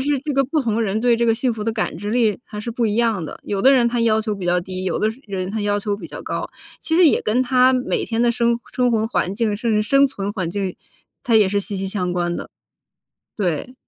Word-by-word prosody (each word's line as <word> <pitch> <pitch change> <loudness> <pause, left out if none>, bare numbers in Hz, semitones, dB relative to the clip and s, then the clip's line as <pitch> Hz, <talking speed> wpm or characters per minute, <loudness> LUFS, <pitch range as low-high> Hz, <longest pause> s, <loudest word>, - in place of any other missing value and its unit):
是， 285 +1 +1
这 295 0 -3
个 275 0 +2
不 300 +4 0
同 225 -1 0
人 215 0 0
对 240 0 +3
这 235 0 +1
个 225 - +4
幸 245 +1 0
福 215 -2 -5
的 225 - 0
感 160 - -2
知 205 +4 -5
力 225 -3 +2
还 210 -1 -7
是 235 - -5
不 235 0 0
一 210 - 0
样 225 -7 +1
的。 - - -8
有 200 -1 -2
的 270 +5 +6
人 245 -3 +4
他 240 0 -2
要 220 -1 +3
求 215 -2 -3
比 185 -2 -5
较 175 0 +2
低， 185 +1 -5
有 180 - -1
的 215 - +2 0.2
人 190 -2 -4
他 220 +1 -3
要 205 0 0
求 205 0 -2
比 - - -9
较 - - -9
高， - - -4 0.3
其 320 - -1
实 350 -1 +6
也 - - +2
跟 240 +4 +1
他 255 0 +4
每 255 0 0
天 230 0 -1
的 240 - +4
生 235 0 +1 0.2
生 250 -1 +2
活 220 -1 +1
环 190 -5 -1
境， 215 -2 0
甚 230 +1 -1
至 210 0 +2
生 275 +5 +4
存 205 -6 -4
环 185 -6 -3
境， 190 0 -3 0.5
它 235 -3 +1
也 210 -3 +5
是 205 +1 0
息 200 0 -3
息 195 0 -2
相 180 -3 -2
关 175 -1 -1
的。 - - -7 0.9
对。 190 - -2
220 Hz, 290 characters per minute, -21 LUFS, 200-240 Hz, 0.9 s, 的